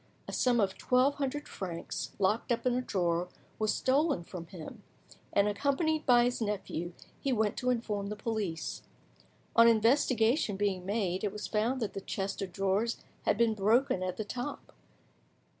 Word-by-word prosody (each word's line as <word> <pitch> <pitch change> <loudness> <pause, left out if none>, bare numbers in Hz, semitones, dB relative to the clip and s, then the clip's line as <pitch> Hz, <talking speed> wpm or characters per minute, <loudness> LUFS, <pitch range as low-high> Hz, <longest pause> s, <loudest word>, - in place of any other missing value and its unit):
A - - -6
sum 245 -2 +3
of 195 -3 0
twelve 255 +3 +3
hundred 290 +1 -2
francs, 175 -3 -5
locked 210 +5 +1
up 235 +1 0
in 250 - +3
a 250 - +1
drawer, 180 -5 0 0.3
was 215 -1 +2
stolen 280 - +2
from 170 -1 -8
him, 185 +5 -9 0.5
and, 200 0 +3
accompanied 290 - 0
by 240 -1 +7
his 245 0 0
nephew, 190 -5 -3 0.3
he 275 - -1
went 220 -4 +1
to 250 - 0
inform 215 -5 -1
the 210 - -4
police. 205 -6 -3 0.7
On 230 0 +8
investigation 230 0 +3
being 190 -2 -1
made, 195 -3 -1
it 205 - 0
was 210 - -6
found 230 +4 0
that 210 - -3
the 195 - -5
chest 195 +1 -3
of 190 -2 -4
drawers 195 +5 0 0.3
had - - +2
been 230 -1 +3
broken 215 +1 +2
at 185 0 -2
the 215 - -3
top. 250 +6 -6
215 Hz, 170 wpm, -31 LUFS, 195-245 Hz, 0.7 s, On